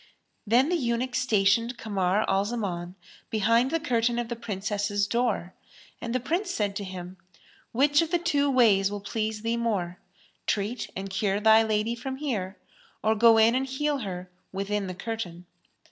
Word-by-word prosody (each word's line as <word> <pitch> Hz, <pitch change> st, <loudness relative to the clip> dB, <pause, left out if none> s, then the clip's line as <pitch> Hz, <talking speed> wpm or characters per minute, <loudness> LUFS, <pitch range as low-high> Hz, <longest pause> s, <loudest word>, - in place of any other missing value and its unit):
Then 250 Hz, +7 st, +4 dB
the 355 Hz, -, +2 dB
eunuch 245 Hz, -2 st, -1 dB
stationed 230 Hz, -1 st, +2 dB
Kamar 200 Hz, -2 st, 0 dB
al 195 Hz, 0 st, +2 dB
Zaman 190 Hz, -6 st, -4 dB, 0.3 s
behind 230 Hz, +4 st, +3 dB
the 330 Hz, +3 st, 0 dB
curtain 240 Hz, -5 st, +1 dB
of 240 Hz, -1 st, -2 dB
the 235 Hz, -, -2 dB
Princess's 205 Hz, -2 st, -2 dB
door 235 Hz, -6 st, -1 dB, 0.5 s
and 235 Hz, +1 st, -3 dB
the -, -, +2 dB
Prince 340 Hz, -, -1 dB
said 205 Hz, -, -1 dB
to 205 Hz, -, -4 dB
him, 185 Hz, -1 st, -8 dB, 0.5 s
"Which 285 Hz, +5 st, +4 dB
of 330 Hz, -, -1 dB
the 350 Hz, -, +2 dB
two 290 Hz, -5 st, +1 dB
ways 215 Hz, -7 st, +4 dB
will 205 Hz, 0 st, -4 dB
please 215 Hz, +1 st, -3 dB
thee 230 Hz, +1 st, 0 dB
more, 195 Hz, -7 st, -2 dB, 0.5 s
treat 210 Hz, +4 st, -1 dB
and 195 Hz, +1 st, -5 dB
cure 195 Hz, +1 st, 0 dB
thy 220 Hz, +1 st, +6 dB
lady 220 Hz, +1 st, 0 dB
from 260 Hz, +3 st, -5 dB
here 215 Hz, -10 st, -3 dB, 0.5 s
or 220 Hz, -, +3 dB
go 225 Hz, +1 st, +6 dB
in 225 Hz, +1 st, +5 dB
and 265 Hz, +1 st, 0 dB
heal 285 Hz, +2 st, -1 dB
her 180 Hz, -4 st, -6 dB, 0.2 s
within 200 Hz, +1 st, -2 dB
the 185 Hz, -, -5 dB
curtain?" 180 Hz, -5 st, -5 dB
220 Hz, 170 wpm, -27 LUFS, 195-245 Hz, 0.5 s, thy